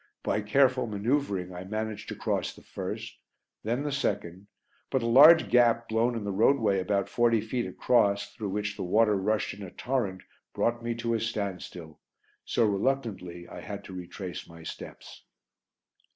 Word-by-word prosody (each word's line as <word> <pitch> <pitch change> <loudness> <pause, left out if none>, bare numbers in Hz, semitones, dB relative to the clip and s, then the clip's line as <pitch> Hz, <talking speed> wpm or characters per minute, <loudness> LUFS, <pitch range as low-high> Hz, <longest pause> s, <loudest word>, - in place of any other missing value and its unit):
By 105 - 0
careful 130 +3 +3
manoeuvring 105 -4 -1
I 90 +1 -6
managed 110 +1 -4
to - - -4
cross - - -2
the - - -16
first, - - -6 0.4
then 120 +6 -1
the 145 - -2
second, 95 -8 -2 0.4
but 130 -3 0
a - - 0
large 150 +7 +8
gap 120 -1 +4
blown 115 +2 +1
in 115 - -3
the 100 - -2
roadway 105 -1 +3
about 100 +1 0
forty 120 -1 +3
feet 115 +3 -2
across, 100 -5 +1
through 110 -4 -4
which 105 +1 -2
the 100 - -7
water 105 +3 +3
rushed 105 +3 0
in 100 - -11
a 95 - -6
torrent, 105 -6 -2 0.3
brought 120 0 0
me 120 0 -2
to 115 0 -1
a 115 - +1
standstill, 95 -7 -5 0.4
so 120 - +1
reluctantly 100 -6 -1
I - - -9
had - - -7
to - - -10
retrace 90 -1 -7
my 85 0 -12
steps. - - -9
110 Hz, 165 wpm, -28 LUFS, 95-120 Hz, 0.4 s, large